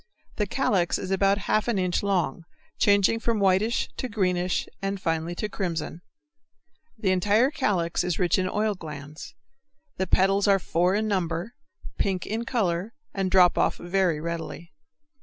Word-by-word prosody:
The 210 - 0
calyx 190 -6 +1
is 190 - -5
about 195 +1 +3
half 215 - +1
an 235 -4 +1
inch 180 -2 0
long, 175 -5 -1 0.3
changing 205 +2 +4
from 230 -1 0
whitish 200 +5 +2
to 255 - -3
greenish, 180 -4 0
and 195 0 -2
finally 165 0 -2
to 215 - -2
crimson. 170 -5 -4 1.0
The 205 -4 +1
entire 210 +8 +3
calyx 185 - 0
is 180 - -1
rich 180 0 +2
in 185 0 0
oil 210 +1 0
glands. 155 - -9 0.6
The 190 - -1
petals 195 +2 +3
are 200 -1 +5
four 180 +1 +1
in 215 +1 0
number, 180 +1 -2 0.5
pink 190 -3 0
in 225 +3 -3
color, 200 -3 -1 0.2
and 195 -1 -1
drop 180 -2 +5
off - - +2
very 175 -3 0
readily. 170 +1 -6
190 Hz, 155 wpm, -26 LUFS, 175-205 Hz, 1.0 s, are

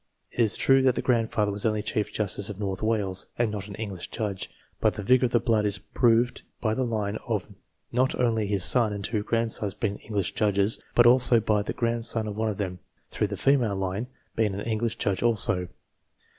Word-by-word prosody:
It - - -12
is 110 -3 +5
true 135 0 +4
that 130 -2 +3
the - - -2
grandfather 115 -4 +1
was 100 0 -4
only 105 -2 0
Chief 105 0 -2
Justice 100 -1 -2
of 105 -1 -7
North 95 -3 -3
Wales, 105 -4 0
and 120 -2 +1
not 100 -2 -5
an 100 - -8
English 100 -5 -6
judge, 105 -5 -4 0.3
but - - +2
the 105 - -5
vigour 125 +4 +4
of - - -10
the 120 - +4
blood 110 -2 +1
is 105 -1 +1
proved 120 +4 +1 0.2
by 110 -2 0
the 130 - 0
line 110 -3 -2
of 105 -5 -1 0.4
not 130 +2 +1
only 110 -4 +1
his 100 -2 0
son 115 -4 +2
and 100 -1 -5
two 110 -2 -1
grandsons 110 -3 0
being 100 -3 -2
English 100 -5 -2
judges, 100 0 +1 0.2
but 120 - +6
also 120 -1 +5
by 105 -1 +1
the 105 - -4
grandson 115 -1 0
of 105 -1 -5
one 110 +1 0
of 105 - -4
them, 90 -3 -4 0.3
through 105 - 0
the 100 -1 -5
female 125 -6 +2
line, 95 +4 -2 0.3
being 105 -4 +1
an 100 - -4
English 115 +1 -1
judge 100 -3 -1
also. 115 -5 +2
110 Hz, 210 wpm, -26 LUFS, 100-115 Hz, 0.4 s, but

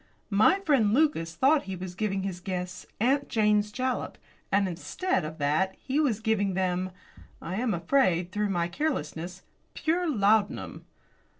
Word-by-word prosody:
"My 215 - +5
friend, 250 - +3
Lucas, 250 - +1
thought 280 0 +3
he 190 0 -4
was 180 0 -6
giving 195 0 -2
his 190 -2 -4
guests 180 0 -5
'Aunt 275 +5 +2
Jane's 210 -2 +2
Jalap,' 255 +2 -2 0.3
and 200 0 +3
instead 185 - -2
of 155 +1 -6
that 155 +6 +1
he 275 +3 -2
was 255 -9 +1
giving 210 -4 0
them 185 0 0 0.5
I 185 +3 -5
am 230 -3 0
afraid, 180 -4 +2
through 210 +1 -1
my 175 -3 0
carelessness 180 - -3 0.3
pure 340 +2 0
laudanum." 210 -4 +1
205 Hz, 145 wpm, -28 LUFS, 180-260 Hz, 0.5 s, My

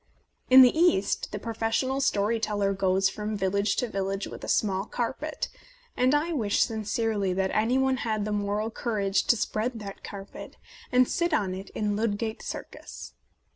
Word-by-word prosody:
In 260 +1 +10
the 250 - +5
East 320 - +2
the 205 - -3
professional 230 +5 -1
story 215 -2 +1
teller 205 -2 0
goes 190 0 +2
from 210 +2 -3
village 200 +1 +1
to 245 - 0
village 195 -1 -2
with - - -9
a - - -5
small 195 -2 +1
carpet; 265 +7 -3 0.5
and 255 +3 +3
I 325 +4 0
wish 220 -9 +2
sincerely 220 -3 -1
that 190 0 0
any 225 +4 +2
one 265 0 +2
had 215 -4 -1
the 215 - -3
moral 210 +2 -1
courage 205 -4 0
to 235 - +4
spread 225 +3 -2
that 200 -2 -8
carpet 195 -1 -9 0.3
and 250 0 +5
sit 340 -2 +1
on 190 -8 0
it 190 +1 -7
in 210 -1 0
Ludgate 220 +1 -2
Circus. - - -8
215 Hz, 170 wpm, -27 LUFS, 200-240 Hz, 0.5 s, In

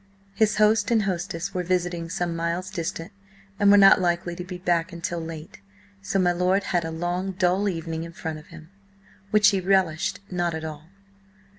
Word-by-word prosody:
His 210 0 +2
host 210 -1 +3
and 225 -3 +3
hostess 180 0 -3
were 180 - -1
visiting 175 -1 -1
some 175 -1 -2
miles 170 +3 -2
distant, 170 -2 -4 0.5
and 205 -1 +5
were 205 - +8
not 195 -1 +7
likely 175 0 0
to 180 - -6
be 180 0 -7
back 175 -1 0
until 170 0 -4
late, 160 -1 -8 0.4
so 195 - -2
my 180 -2 +3
lord 180 +3 +1
had 175 -3 0
a 165 - -4
long 175 +3 -3
dull 185 +2 +1
evening 165 -2 -4
in 170 - -8
front 160 -2 -6
of 150 - -17
him, 160 +3 -13 0.6
which 210 0 +5
he 195 -2 0
relished 185 -4 +1
not 175 -2 -1
at 160 0 -5
all. 155 -1 -7
175 Hz, 185 wpm, -25 LUFS, 165-195 Hz, 0.6 s, were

